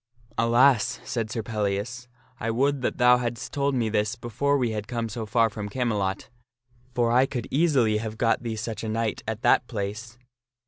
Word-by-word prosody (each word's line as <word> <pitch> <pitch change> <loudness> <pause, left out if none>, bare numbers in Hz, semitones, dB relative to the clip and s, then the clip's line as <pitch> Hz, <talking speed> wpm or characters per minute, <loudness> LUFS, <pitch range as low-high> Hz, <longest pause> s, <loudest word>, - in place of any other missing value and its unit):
" 115 0 -30
Alas! 125 0 +4
" - - -20
said 115 -3 -3
Sir 115 0 -3
Pellias, 110 +3 -2 0.2
" - - -33
I 115 - -2
would 135 +4 +1
that - - -1
thou 125 0 +6
hadst 120 0 -4
told 140 -1 0
me 120 -3 +1
this 105 +1 0
before 125 +4 0
we 125 -4 0
had 105 -1 -4
come 115 -1 -2
so 110 0 -5
far 115 +2 +3
from 105 -1 -6
Camelot; 105 -5 -2 0.6
for 120 -1 +2
I 130 +3 +4
could 120 -4 -4
easily 135 -8 +3
have 110 0 -5
got 115 -1 +2
thee 115 -2 -3
such 110 0 -5
a 110 - -3
knight 110 0 -1
at 110 +1 -4
that 120 - +4
place. 110 +2 -5
115 Hz, 200 wpm, -26 LUFS, 110-125 Hz, 0.6 s, thou